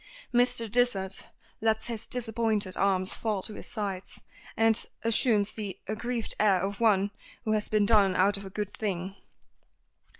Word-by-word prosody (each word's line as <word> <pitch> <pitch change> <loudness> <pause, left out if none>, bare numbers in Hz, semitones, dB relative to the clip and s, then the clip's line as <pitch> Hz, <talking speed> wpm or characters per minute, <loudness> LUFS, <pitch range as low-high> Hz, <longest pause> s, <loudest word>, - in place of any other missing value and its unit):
Mr. 245 -1 +3
Dysart 205 -4 0 0.3
lets 220 0 +1
his 230 -2 -4
disappointed 225 -5 -1
arms 190 -1 +2
fall 210 -4 -2
to 215 - -6
his - - -8
sides, 195 -4 -4 0.4
and 225 0 +3 0.2
assumes 225 -2 +2
the 205 -4 -5
aggrieved 230 +2 -2
air 200 -3 +4
of 195 +1 -3
one 205 -3 +3 0.3
who 215 - 0
has 215 -1 0
been 210 -1 +3
done 200 -3 +4
out 200 +2 +4
of 200 - -2
a 195 - -7
good 205 +1 -4
thing. 195 -2 -3
210 Hz, 155 wpm, -29 LUFS, 195-225 Hz, 0.4 s, air